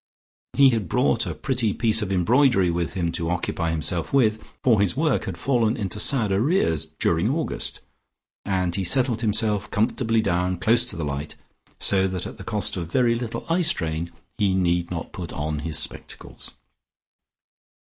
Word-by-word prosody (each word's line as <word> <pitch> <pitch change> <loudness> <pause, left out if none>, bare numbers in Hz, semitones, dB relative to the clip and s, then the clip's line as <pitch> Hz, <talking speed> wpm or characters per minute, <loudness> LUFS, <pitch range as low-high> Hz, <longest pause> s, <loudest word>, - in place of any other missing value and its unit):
He 140 -1 +6
had 110 -7 -2
brought - - +1
a - - -4
pretty 120 -6 -1
piece 110 -1 +3
of 100 -2 -3
embroidery 100 0 +3
with 85 -1 -2
him 85 -3 -1
to 85 -1 -2
occupy 85 -1 -1
himself 80 +1 -2
with, 110 -6 +2 0.2
for 115 -6 +4
his 100 +4 +1
work 150 -3 +1
had 95 -3 -5
fallen 120 +1 +1
into 100 -1 -3
sad 115 -3 +2
arrears 100 - +1
during 85 +8 +1
August, 160 +2 -3 0.6
and 90 -3 -1
he 95 +1 -1
settled 120 +3 +1
himself 105 -2 0
comfortably 115 +2 +1
down 90 -3 0
close 115 +6 +3
to 125 - -4
the 85 - -3
light, 70 +1 -5 0.4
so 95 -1 +2
that 95 -2 -4
at - - -8
the - - -7
cost - - -1
of 85 -1 -5
very 120 -2 +3
little 115 -1 -4
eye 170 +2 +1
strain, 85 - 0 0.3
he 100 -2 +2
need 85 -2 +1
not 85 -2 -5
put 90 -3 -6
on 75 0 -3
his 75 +1 -4
spectacles. 80 - -7
100 Hz, 170 wpm, -24 LUFS, 85-115 Hz, 0.6 s, He